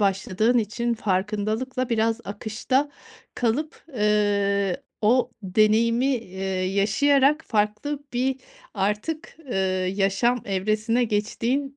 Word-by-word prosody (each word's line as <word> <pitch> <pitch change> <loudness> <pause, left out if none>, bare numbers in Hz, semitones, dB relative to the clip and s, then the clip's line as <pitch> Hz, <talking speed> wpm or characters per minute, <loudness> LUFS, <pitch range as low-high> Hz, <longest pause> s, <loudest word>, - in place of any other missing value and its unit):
başladığın 200 +4 +2
için 235 +2 -1
farkındalıkla 215 +5 -1
biraz 225 0 +1
akışta 225 +7 -1 0.4
kalıp, 265 +7 -2
eee, 200 -3 +2 0.3
o 245 +3 +3
deneyimi, 220 +6 +3
eee, 190 -4 -8 0.3
yaşayarak 275 +9 +3
farklı 215 +7 -1
bir 260 +2 0 0.4
artık, 210 +13 -2
eee, - - -1 0.4
yaşam 205 +5 +1
evresine 215 +5 0
geçtiğin, 235 +6 -1
220 Hz, 90 wpm, -24 LUFS, 205-250 Hz, 0.4 s, o